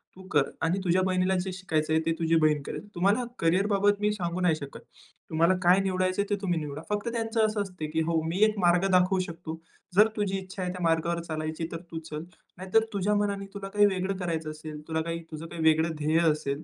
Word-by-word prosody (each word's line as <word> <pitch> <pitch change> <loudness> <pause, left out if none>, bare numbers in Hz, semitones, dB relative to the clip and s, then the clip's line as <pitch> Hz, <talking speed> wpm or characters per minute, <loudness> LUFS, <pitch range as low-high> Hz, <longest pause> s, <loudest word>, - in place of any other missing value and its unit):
तू 190 - -12
कर. 145 -2 +4 0.2
आणि 170 +4 +1
तुझ्या 180 0 +3
बहिणीला 185 0 +1
जे 185 +1 -3
शिकायचं 160 -5 -1
आहे, 160 - +4
ते 165 - +2
तुझी 165 0 +2
बहीण 150 -1 +3
करेल. 205 - -6
तुम्हाला 200 +7 +2 0.2
करियर 180 +5 +2
बाबत 205 0 +2
मी 210 0 +2
सांगू 180 -3 -3
नाही 175 -3 +3
शकत. 140 -2 -8 0.5
तुम्हाला 165 +3 +3
काय 180 +2 +6
निवडायचं 185 0 0
आहे, 200 - -4
ते 205 - +2
तुम्ही 175 -4 0
निवडा." 150 -1 -6
फक्त 210 +2 -1
त्यांचं 225 -1 +1
असं 215 -1 0
असते 180 -6 -5
की 160 +1 +1
"हो, 165 -1 +1
मी 175 +5 -2
एक 215 -1 0
मार्ग 175 +1 +3
दाखवू 185 +1 +4
शकतो. 165 -1 -7 0.4
जर 210 +3 +7
तुझी 200 -2 0
इच्छा 190 0 -7
आहे 180 - -2
त्या 180 - -7
मार्गावर 165 +1 +1
चालायची 155 0 -4
तर 165 - -5
तू 165 - -4
चल. 150 +1 -5 0.3
नाहीतर 190 +5 +2
तुझ्या 205 +1 +1
मनाने 200 -1 0
तुला 195 -1 -6
काही 205 +1 +4
वेगळं 190 -1 0
करायचं 165 -4 -3
असेल, 155 0 -8
तुला 160 0 -1
काय 165 +1 -3
तुझं 155 +1 -6
काही 170 0 -7
वेगळं 160 +1 +3
ध्येय 155 +2 +3
असेल, 150 -1 -3
180 Hz, 225 wpm, -28 LUFS, 160-195 Hz, 0.5 s, जर